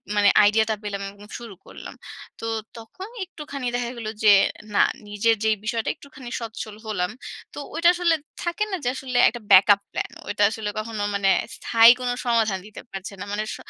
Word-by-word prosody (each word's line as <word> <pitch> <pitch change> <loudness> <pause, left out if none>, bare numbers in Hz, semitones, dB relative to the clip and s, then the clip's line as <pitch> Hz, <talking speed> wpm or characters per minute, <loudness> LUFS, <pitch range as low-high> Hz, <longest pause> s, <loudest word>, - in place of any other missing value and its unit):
মানে 205 -1 +5
আইডিয়াটা 220 +1 +3
পেলাম 200 -1 -4
এবং 205 +1 -15
শুরু 230 -5 -10
করলাম। - - -10 0.4
তো - - -6 0.3
তখন 300 - -10
একটুখানি 295 -7 -6
দেখা 245 -1 -1
গেল 225 -2 -5 0.2
যে 210 -1 +8 0.4
না - - +6 0.2
নিজের 205 +2 +2
যে 220 - +3 0.2
বিষয়টা 225 0 -1
একটুখানি 270 -3 -12
সচ্ছল 220 -2 -6
হলাম। 180 -5 -2 0.4
তো - - -12 0.2
ঐটা 335 +1 +5
আসলে 350 -2 +2 0.3
থাকে 345 +4 -1
না - - 0
যে 245 - +1
আসলে 260 -1 -3
একটা 240 +1 -8
backup 200 +1 +7
plan। - - -3 0.2
ঐটা 205 0 0
আসলে 215 -1 -4
কখনো 215 -1 -5
মানে 200 -1 +2 0.3
স্থায়ী 230 0 +6
কোনো 245 -1 -1
সমাধান 225 -5 +2
দিতে 215 - -10
পারছে 195 +1 -7
না। - - -4
মানে 210 +1 -1
স - - -5
220 Hz, 180 wpm, -24 LUFS, 205-245 Hz, 0.4 s, যে